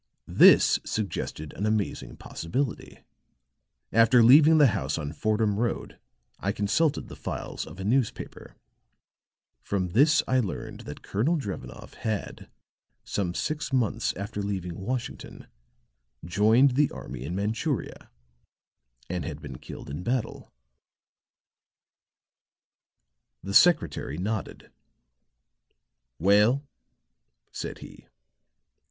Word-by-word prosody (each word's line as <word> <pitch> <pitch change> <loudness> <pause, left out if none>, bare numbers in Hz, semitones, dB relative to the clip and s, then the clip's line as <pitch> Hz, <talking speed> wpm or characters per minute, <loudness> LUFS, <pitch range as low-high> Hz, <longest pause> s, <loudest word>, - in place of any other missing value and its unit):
"This - - +6
suggested 85 -7 -4
an 105 - -2
amazing 110 -2 -2
possibility. 125 - -4 0.9
After 115 +2 +5
leaving 150 +6 +7
the 150 - +7
house 75 -6 -2
on 75 -1 -4
Fordham 110 0 0
Road 120 0 -3 0.4
I 100 - -1
consulted 110 +9 0
the - - -10
files - - -5
of 90 - -11
a - - -4
newspaper; 120 +3 -2 1.1
from 95 -3 -2
this 145 - +4
I 130 - +3
learned 105 -8 -4
that - - -9
Colonel 125 - 0
Drevenoff 115 - -6
had, 110 -3 -4 0.5
some 90 -3 -2
six 150 -2 -3
months 125 -5 +1
after 100 +1 -5
leaving 95 -4 -4
Washington, 120 +5 -5 0.8
joined 110 +9 +4
the 140 +3 +2
army 65 -1 -8
in 85 +6 -4
Manchuria 110 - -3 1.0
and 90 -1 -3
had - - -6
been - - -9
killed - - -10
in 70 +5 -5
battle." 120 +4 -3 2.9
The 100 - -5
secretary 155 - +3
nodded. 105 +3 -4 1.5
"Well?" 105 - +3 0.9
said - - -6
he. - - -15
105 Hz, 105 wpm, -27 LUFS, 95-130 Hz, 2.9 s, leaving